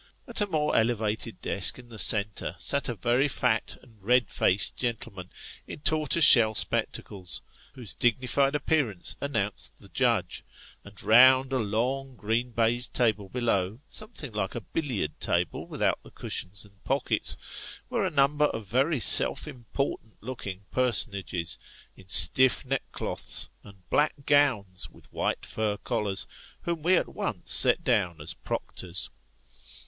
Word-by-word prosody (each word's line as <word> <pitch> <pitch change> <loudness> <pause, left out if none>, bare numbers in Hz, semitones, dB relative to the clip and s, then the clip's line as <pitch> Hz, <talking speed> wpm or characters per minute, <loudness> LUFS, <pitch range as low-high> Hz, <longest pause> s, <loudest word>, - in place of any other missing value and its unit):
At - - -6
a 205 - +1
more 155 -5 -1
elevated 110 -1 -1
desk 100 -1 +1
in 120 -1 -14
the 110 -2 -9
centre, 105 0 +4
sat 140 -2 +1
a 120 - -3
very 120 +8 +1
fat 125 -5 -1
and 115 -5 -21
red 125 +3 +2
faced 90 -2 +1
gentleman, 105 -6 -5 0.4
in - - -9
tortoise 155 +1 +3
shell 110 -3 +7
spectacles, 95 -2 -2 0.3
whose 125 -6 -5
dignified 130 +4 0
appearance 140 - -1
announced 105 -8 -2
the - - -16
judge; - - 0 0.4
and 100 -1 -9
round 130 +3 +5
a 130 - +1
long 125 +5 -2
green 115 +3 -2
baized 120 +1 -1
table 110 -5 0
below, 110 -4 -1
something 215 - -6
like 105 -3 -4
a 120 - -4
billiard 110 - -4
table - - -2
without - - -1
the - - -16
cushions 100 +4 -4
and 100 +1 -23
pockets, 135 0 -1
were - - -2
a - - 0
number 145 +1 +2
of 110 -7 -4
very 135 - 0
self 110 - +5
important 120 -2 -5
looking 100 -5 -8
personages, 100 -9 -2 0.4
in 95 - -18
stiff 95 +12 +7
neckcloths, 135 +1 -3
and 100 -3 -17
black 150 +1 +2
gowns 120 -11 +1
with - - -21
white - - -2
fur 105 -2 -2
collars, 105 -5 -2 0.4
whom 170 -2 -3
we 180 +4 +3
at - - -1
once - - -2
set - - +6
down 85 -3 0
as 75 +2 -4
proctors. 90 0 -5
115 Hz, 145 wpm, -27 LUFS, 100-135 Hz, 0.4 s, shell